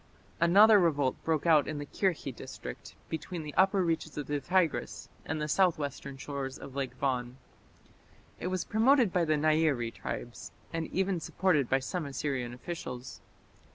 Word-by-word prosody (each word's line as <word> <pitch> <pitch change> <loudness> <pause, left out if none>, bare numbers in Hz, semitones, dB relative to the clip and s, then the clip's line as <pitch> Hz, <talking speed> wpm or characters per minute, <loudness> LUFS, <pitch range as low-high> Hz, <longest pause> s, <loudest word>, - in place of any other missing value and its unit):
Another 205 +6 +7
revolt 145 -7 +2
broke 160 -1 0
out 155 -4 +5
in 155 - -3
the 145 - -4
Kirkhi 155 - -1
district 60 - -9
between 160 +1 -5
the 150 -1 -7
upper 190 0 +4
reaches 160 -2 -2
of 145 - -3
the 145 +1 -1
Tigris 175 +2 0 0.2
and 155 +1 -2
the 150 - -2
southwestern 145 -5 0
shores 135 -1 -5
of 135 - -10
Lake 135 -2 -3
Van. 125 -2 -1 1.0
It - - -3
was 185 -1 -2
promoted 235 -1 +4
by 175 -2 +2
the 155 -1 +2
Nairi 155 -6 +2
tribes, 120 0 -6 0.2
and 165 -1 -2
even 190 -1 0
supported 160 -5 +1
by 135 - +4
some 155 +3 -3
Assyrian 135 -3 -2
officials. 125 -2 -7
155 Hz, 155 wpm, -30 LUFS, 135-175 Hz, 1.0 s, Another